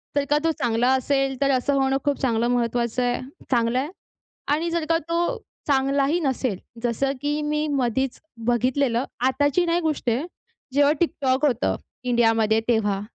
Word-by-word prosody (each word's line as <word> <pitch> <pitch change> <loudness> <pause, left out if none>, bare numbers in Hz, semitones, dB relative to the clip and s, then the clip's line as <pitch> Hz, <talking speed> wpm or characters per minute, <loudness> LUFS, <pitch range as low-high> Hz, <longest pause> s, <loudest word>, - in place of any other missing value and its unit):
तर 285 0 +2
का 295 - +4
तो 325 - +3
चांगला 240 +1 +2
असेल 270 +1 +1
तर 275 0 +3
असं 280 +3 0
होणं 270 0 +2
खूप 285 -1 +1
चांगलं 235 -2 +1
महत्त्वाचं 240 0 0
आहे, 245 0 0 0.3
चांगलं 235 +1 +2
आहे. 290 +4 -2 0.6
आणि 335 +3 0
जर 335 -2 -1
का 330 - +4
तो 345 +8 0 0.3
चांगलाही 275 +3 +2
नसेल. 260 - -1 0.3
जसं 245 +3 0
की 295 +1 -1
मी 300 +1 -1
मधीच 265 -1 0 0.3
बघितलेलं, 245 +1 +1 0.2
आताची 285 +6 +2
नाही 340 +1 +1
गोष्ट 305 -6 -1
आहे. 250 +8 0 0.5
जेव्हा 285 +1 +4
TikTok 275 -3 0
होतं 245 -3 0 0.3
इंडियामध्ये 225 -3 +3
तेव्हा 210 -4 +1
265 Hz, 155 wpm, -24 LUFS, 240-290 Hz, 0.6 s, का